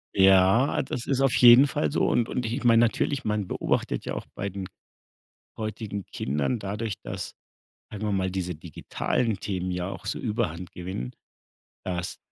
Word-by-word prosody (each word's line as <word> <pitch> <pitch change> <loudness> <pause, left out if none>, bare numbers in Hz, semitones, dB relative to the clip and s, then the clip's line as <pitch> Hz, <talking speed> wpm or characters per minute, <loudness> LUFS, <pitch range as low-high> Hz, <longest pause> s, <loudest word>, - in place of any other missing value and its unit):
Ja, 95 +7 +5
das 130 -2 -4
ist 135 -1 0
auf 135 -2 +3
jeden 125 +3 +8
Fall 75 - -1
so - - +2
und 115 - +1
und 125 - -2
ich 120 +5 -3
meine, 115 -1 +6
natürlich, 130 +4 +1
man 105 -2 -1
beobachtet - - -1
ja - - -3
auch - - -5
bei 100 +1 -3
den 95 -1 -6 0.9
heutigen 105 -2 -4
Kindern 75 - -1
dadurch, 105 +1 -3
dass, - - -6 0.6
sagen 105 +1 -5
wir 105 - 0
mal, 95 -1 0
diese 90 -1 -3
digitalen 95 - -2
Themen 95 -2 -3
ja 90 0 -2
auch - - -8
so - - -2
Überhand 100 -7 -2
gewinnen, 90 -9 -5 0.7
dass 90 -1 -3
100 Hz, 165 wpm, -26 LUFS, 90-115 Hz, 0.9 s, jeden